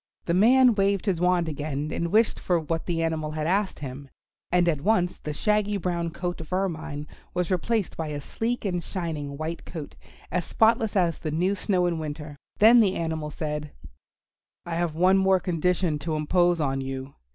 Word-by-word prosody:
The 170 Hz, -, 0 dB
man 245 Hz, +6 st, +6 dB
waved 200 Hz, -1 st, +1 dB
his 185 Hz, -5 st, 0 dB
wand 180 Hz, -2 st, +2 dB
again 150 Hz, 0 st, -3 dB
and 170 Hz, 0 st, -2 dB
wished 220 Hz, +2 st, +3 dB
for 175 Hz, -2 st, +1 dB
what 165 Hz, +1 st, -3 dB
the 165 Hz, -2 st, 0 dB
animal 160 Hz, -2 st, -1 dB
had 155 Hz, 0 st, -2 dB
asked 195 Hz, +3 st, +1 dB
him, 140 Hz, 0 st, -7 dB, 0.4 s
and 175 Hz, 0 st, +3 dB
at 155 Hz, -5 st, +1 dB
once 180 Hz, -1 st, +1 dB
the 150 Hz, -, -5 dB
shaggy 210 Hz, +5 st, +1 dB
brown 170 Hz, -2 st, -1 dB
coat 175 Hz, +1 st, -4 dB
of 160 Hz, -, -11 dB
Ermine 160 Hz, -6 st, -2 dB, 0.3 s
was 180 Hz, +1 st, -1 dB
replaced 205 Hz, +3 st, 0 dB
by 160 Hz, -, -3 dB
a 150 Hz, -1 st, -4 dB
sleek 225 Hz, +11 st, -3 dB
and 180 Hz, -3 st, -1 dB
shining 155 Hz, -7 st, -4 dB
white 160 Hz, +2 st, -4 dB
coat 160 Hz, -5 st, -8 dB, 0.4 s
as 180 Hz, +1 st, 0 dB
spotless 220 Hz, +1 st, +2 dB
as 175 Hz, -4 st, +2 dB
the 155 Hz, -, -3 dB
new 175 Hz, +6 st, +1 dB
snow 185 Hz, -2 st, +1 dB
in 170 Hz, -2 st, 0 dB
winter. 150 Hz, -1 st, -6 dB, 0.2 s
Then 230 Hz, +3 st, +7 dB
the 200 Hz, -4 st, +3 dB
animal 160 Hz, -2 st, -2 dB
said, 150 Hz, -1 st, -4 dB, 0.9 s
"I 170 Hz, -, -4 dB
have 170 Hz, -2 st, -1 dB
one 185 Hz, +3 st, +4 dB
more 190 Hz, -1 st, +4 dB
condition 175 Hz, -2 st, 0 dB
to 155 Hz, +2 st, -2 dB
impose 175 Hz, +3 st, +2 dB
on 135 Hz, -3 st, 0 dB
you. 135 Hz, +1 st, -5 dB
170 Hz, 185 wpm, -26 LUFS, 155-190 Hz, 0.9 s, Then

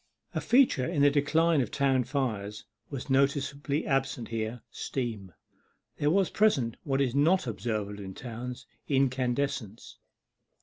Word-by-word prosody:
A -, -, -1 dB
feature 240 Hz, -, +4 dB
in 160 Hz, -4 st, +1 dB
the 145 Hz, -, +6 dB
decline 155 Hz, +2 st, +3 dB
of 120 Hz, -, -2 dB
town 135 Hz, -3 st, +2 dB
fires 110 Hz, -6 st, -3 dB, 0.2 s
was 140 Hz, -2 st, -6 dB
noticeably 140 Hz, +2 st, +1 dB
absent 135 Hz, -4 st, -1 dB
here 115 Hz, +1 st, -3 dB
steam. 110 Hz, -8 st, -4 dB, 0.7 s
There 145 Hz, -, +2 dB
was 190 Hz, +3 st, +2 dB
present 135 Hz, -, +2 dB
what 135 Hz, -2 st, 0 dB
is 130 Hz, -3 st, +1 dB
not 160 Hz, +6 st, +3 dB
observable 105 Hz, -3 st, -3 dB
in 95 Hz, -1 st, -8 dB
towns 125 Hz, +1 st, -7 dB, 0.2 s
incandescence. 130 Hz, -4 st, -1 dB
135 Hz, 130 wpm, -29 LUFS, 115-145 Hz, 0.7 s, the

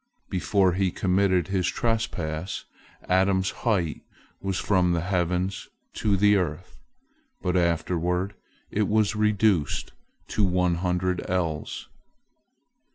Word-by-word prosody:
Before 95 Hz, 0 st, +2 dB
he 95 Hz, +1 st, +1 dB
committed 95 Hz, 0 st, +1 dB
his 95 Hz, -2 st, +1 dB
trespass, 95 Hz, -8 st, -2 dB, 0.4 s
Adam's 95 Hz, 0 st, +2 dB
height 95 Hz, -10 st, -1 dB, 0.4 s
was 95 Hz, -1 st, -2 dB
from 90 Hz, -3 st, +2 dB
the 85 Hz, -, 0 dB
heavens 90 Hz, +1 st, -1 dB, 0.2 s
to 100 Hz, -2 st, +1 dB
the 105 Hz, +1 st, +5 dB
earth, 90 Hz, -1 st, -3 dB, 0.7 s
but 90 Hz, -, 0 dB
afterward 90 Hz, +2 st, 0 dB, 0.4 s
it 105 Hz, -1 st, +1 dB
was 110 Hz, 0 st, +2 dB
reduced 105 Hz, -7 st, +1 dB, 0.4 s
to 105 Hz, -, +1 dB
one 90 Hz, -2 st, +2 dB
hundred 90 Hz, 0 st, 0 dB
ells. 85 Hz, -4 st, -2 dB
95 Hz, 105 wpm, -26 LUFS, 90-100 Hz, 0.7 s, the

